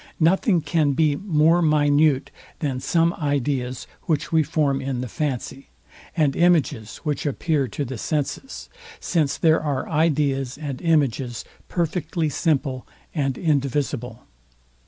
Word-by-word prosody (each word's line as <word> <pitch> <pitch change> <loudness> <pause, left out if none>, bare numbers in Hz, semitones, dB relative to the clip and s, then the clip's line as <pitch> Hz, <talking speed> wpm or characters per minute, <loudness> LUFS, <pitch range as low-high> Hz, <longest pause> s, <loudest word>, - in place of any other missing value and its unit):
Nothing 175 +2 +3
can 150 -1 +1
be 150 0 +2
more 165 -1 +3
minute, 150 -2 +3 0.3
than 135 -5 -2
some 165 +5 +2
ideas, 140 -4 -1 0.2
which 150 -3 -1
we 160 -1 +4
form 145 -3 0
in 130 -2 -3
the 125 - -4
fancy; 135 0 -4 0.5
and 150 -4 +2
images, 155 -11 +2
which 150 -3 -2
appear 145 -1 0
to 140 +6 -4
the 125 -2 -6
senses; 155 - -3 0.3
since 155 -5 0
there 160 -1 +3
are 145 -4 -2
ideas 145 -4 +1
and 145 -4 -5
images 135 -7 0 0.2
perfectly 165 -2 -1
simple 140 -4 -1 0.3
and 135 -4 -1
indivisible. 135 -6 -1
145 Hz, 125 wpm, -23 LUFS, 135-160 Hz, 0.5 s, we